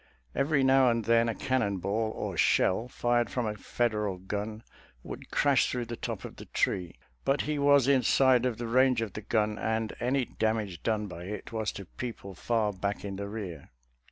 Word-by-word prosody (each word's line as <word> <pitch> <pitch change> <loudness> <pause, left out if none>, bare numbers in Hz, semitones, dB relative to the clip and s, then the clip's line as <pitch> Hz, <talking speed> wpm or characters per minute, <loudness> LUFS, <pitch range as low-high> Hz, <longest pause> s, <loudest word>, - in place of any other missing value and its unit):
Every 140 -1 +2
now 130 -1 +5
and 115 -2 0
then 115 +1 +4
a 115 - -2
cannon 120 -7 0
ball 110 +4 -1
or - - -4
shell, 110 +6 +3
fired 120 -1 +1
from 125 -2 -2
a 105 - -1
Federal 105 -3 -1
gun, 105 +4 -5 0.4
would - - -8
crash 140 -4 +3
through 125 -1 -2
the 120 +1 -5
top - - -5
of - - -9
the - - -9
tree; 90 -3 -1 0.3
but 135 +1 +2
he 150 -1 -2
was 140 -2 +5
inside 130 -2 +4
of 120 -3 -3
the 120 - -4
range 125 0 +3
of 110 - -6
the 105 - -5
gun, 105 0 0
and 110 0 -1
any 130 +1 +1
damage 110 -6 -2
done 110 -2 0
by 90 -3 -8
it 105 +2 -6
was 110 -1 -1
to 100 - -8
people 110 -1 -7
far 110 +2 0
back 100 +2 -3
in 100 -1 -5
the 100 0 -4
rear. 100 -6 -7
115 Hz, 195 wpm, -29 LUFS, 105-125 Hz, 0.4 s, now